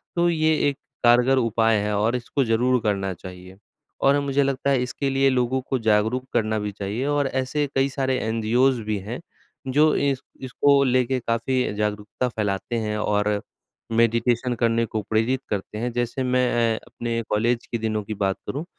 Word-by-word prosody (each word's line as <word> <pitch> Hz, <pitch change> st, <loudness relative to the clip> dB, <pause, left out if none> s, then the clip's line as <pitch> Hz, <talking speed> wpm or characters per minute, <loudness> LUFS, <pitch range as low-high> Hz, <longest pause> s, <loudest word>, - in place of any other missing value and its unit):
तो 175 Hz, 0 st, +3 dB
ये 160 Hz, -1 st, +2 dB, 0.2 s
एक 140 Hz, -, -5 dB, 0.3 s
कारगर 125 Hz, +3 st, +5 dB
उपाय 115 Hz, -2 st, +2 dB
है 105 Hz, 0 st, -1 dB
और 115 Hz, +4 st, +1 dB
इसको 125 Hz, +3 st, -1 dB
ज़रूर 125 Hz, +3 st, +2 dB
करना 100 Hz, -3 st, 0 dB
चाहिए 90 Hz, +1 st, -11 dB, 0.4 s
और 140 Hz, +1 st, +4 dB
मुझे 140 Hz, 0 st, +1 dB
लगता 135 Hz, 0 st, -1 dB
है 130 Hz, -3 st, +2 dB
इसके 135 Hz, +2 st, -2 dB
लिए 135 Hz, 0 st, +3 dB
लोगों 130 Hz, 0 st, +1 dB
को 130 Hz, -, 0 dB
जागरूक 110 Hz, +4 st, +1 dB
करना 110 Hz, -2 st, +1 dB
भी 105 Hz, 0 st, -3 dB
चाहिए 100 Hz, +6 st, -4 dB
और 145 Hz, -1 st, +1 dB
ऐसे 130 Hz, +3 st, -1 dB
कई 135 Hz, +1 st, +2 dB
सारे 130 Hz, -1 st, -1 dB
एनजीओज़ 115 Hz, +3 st, +2 dB
भी 105 Hz, -1 st, -2 dB
हैं 110 Hz, +6 st, -6 dB, 0.5 s
जो 150 Hz, +3 st, +4 dB
इस 140 Hz, -2 st, 0 dB, 0.2 s
इसको 140 Hz, +2 st, +3 dB
लेके 130 Hz, 0 st, +1 dB
काफ़ी 115 Hz, +1 st, -1 dB
जागरूकता 105 Hz, +3 st, -2 dB
फैलाते 105 Hz, +1 st, -2 dB
हैं 105 Hz, -1 st, -2 dB
और 105 Hz, 0 st, 0 dB, 0.7 s
मेडिटेशन 115 Hz, +2 st, +2 dB
करने 115 Hz, -1 st, +2 dB
को 110 Hz, -1 st, -3 dB
प्रेरित 115 Hz, +4 st, +1 dB
करते 105 Hz, +1 st, -4 dB
हैं। 120 Hz, +2 st, -2 dB
जैसे 120 Hz, +2 st, -2 dB
मैं 125 Hz, -3 st, +2 dB
अपने 115 Hz, -1 st, -3 dB
कॉलेज 115 Hz, +3 st, +1 dB
के 115 Hz, -, 0 dB
दिनों 110 Hz, -1 st, -1 dB
की 110 Hz, +2 st, -5 dB
बात 95 Hz, 0 st, 0 dB
करूँ 150 Hz, +5 st, -4 dB
120 Hz, 170 wpm, -23 LUFS, 110-130 Hz, 0.7 s, कारगर